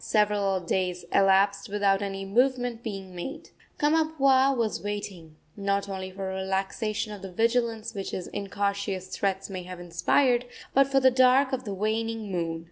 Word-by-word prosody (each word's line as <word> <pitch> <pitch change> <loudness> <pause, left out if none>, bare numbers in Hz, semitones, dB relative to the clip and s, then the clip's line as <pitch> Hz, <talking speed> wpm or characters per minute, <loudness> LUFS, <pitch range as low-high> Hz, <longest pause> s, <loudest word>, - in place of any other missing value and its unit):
Several 205 -3 +2
days 180 0 -1
elapsed 195 +1 +3
without 200 -1 +2
any 195 -1 -4
movement 245 +2 +1
being 195 -5 -6
made. 275 - -7 0.3
Kamapuaa 275 -4 +3
was 225 -2 -1
waiting, 195 -6 -5 0.2
not 200 0 -1
only 190 -1 -5
for 190 0 -5
a 190 - -4
relaxation 205 +3 -2
of 205 - -9
the 195 -1 -7
vigilance 230 +1 0
which 195 -2 -4
his 180 - -4
incautious 200 -1 -3
threats 195 -1 -1
may 185 -2 -5
have 180 0 -9
inspired, 235 +9 +2 0.3
but 275 0 +5
for 270 0 +3
the 260 -1 +5
dark 260 +1 +4
of 260 -1 -2
the 205 - -3
waning 220 +1 -2
moon. 165 -2 -2
200 Hz, 160 wpm, -27 LUFS, 190-240 Hz, 0.3 s, but